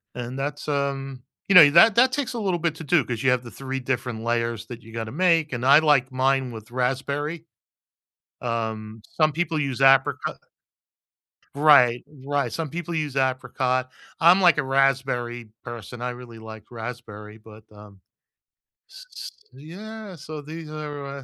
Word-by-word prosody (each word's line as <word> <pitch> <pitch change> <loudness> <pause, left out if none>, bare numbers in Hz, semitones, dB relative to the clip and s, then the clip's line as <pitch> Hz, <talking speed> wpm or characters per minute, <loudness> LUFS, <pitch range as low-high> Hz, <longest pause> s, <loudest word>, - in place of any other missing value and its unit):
and 125 +1 -6
that's, 145 +2 -4
um 135 -2 -3 0.3
you 195 - +4
know, 150 -5 +10
that 200 +6 +7
that 255 +2 +5
takes 280 -4 -2
a 235 - -4
little 185 -5 -1
bit 160 -1 -1
to 165 - -9
do 150 -2 +3
‘cause 120 0 -4
you 135 - +4
have 125 -1 +1
the 120 - -10
3 135 0 -4
different 125 -3 -3
layers 115 -1 -1
that 120 -1 -9
you 115 0 -14
gotta 110 -1 -5
make 165 -1 +2
and 120 +1 -3
I 140 +3 +7
like 145 -4 +2
mine 130 -1 +1
with 110 -1 -10
raspberry. 140 +6 -2 1.0
Um, 110 -2 -4 0.2
some 155 -1 +3
people 165 0 -2
use 135 -3 -2
apricot 135 0 +3 1.2
Right, 140 -5 +5 0.2
right, 140 -5 -1
some 160 +4 -3
people 170 +1 -5
use 150 -4 -3
apricot. 130 0 0 0.3
I'm, 175 +4 +6
like, 175 -4 +5
a - - +2
raspberry 130 -3 0 0.2
person. 120 +1 -8
I 125 - -2
really 120 -2 -10
like 110 -1 -10
raspberry, 110 -2 -8
but, 110 0 -15
um, 105 -2 -15 0.9
s - - -13
s - - -7 0.2
Yeah, 200 +6 -9
so 155 0 -8
these 155 +1 -9
are 145 -3 -7
135 Hz, 165 wpm, -24 LUFS, 120-155 Hz, 1.2 s, know